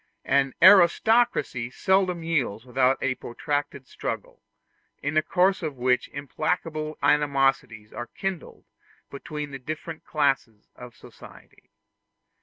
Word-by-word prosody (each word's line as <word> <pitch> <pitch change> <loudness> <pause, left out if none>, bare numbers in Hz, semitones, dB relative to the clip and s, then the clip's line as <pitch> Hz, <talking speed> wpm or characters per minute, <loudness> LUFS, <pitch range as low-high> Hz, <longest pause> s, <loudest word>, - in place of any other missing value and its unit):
An 135 -1 +1
aristocracy 190 - +4
seldom 185 +3 +1
yields 130 -9 -1
without 130 +1 +2
a 135 - +1
protracted 140 +2 -4
struggle, - - -6 0.6
in 145 +1 -1
the 155 - +4
course 185 +4 +1
of 155 -4 -4
which 125 0 +1
implacable 155 +2 -3
animosities 135 -7 +1
are 120 - -6
kindled 195 -3 -6 0.5
between 145 +1 -6
the 135 - -7
different 155 +4 -7
classes 135 -8 -1
of 125 -1 -12
society. - - -16
145 Hz, 110 wpm, -25 LUFS, 130-165 Hz, 0.6 s, aristocracy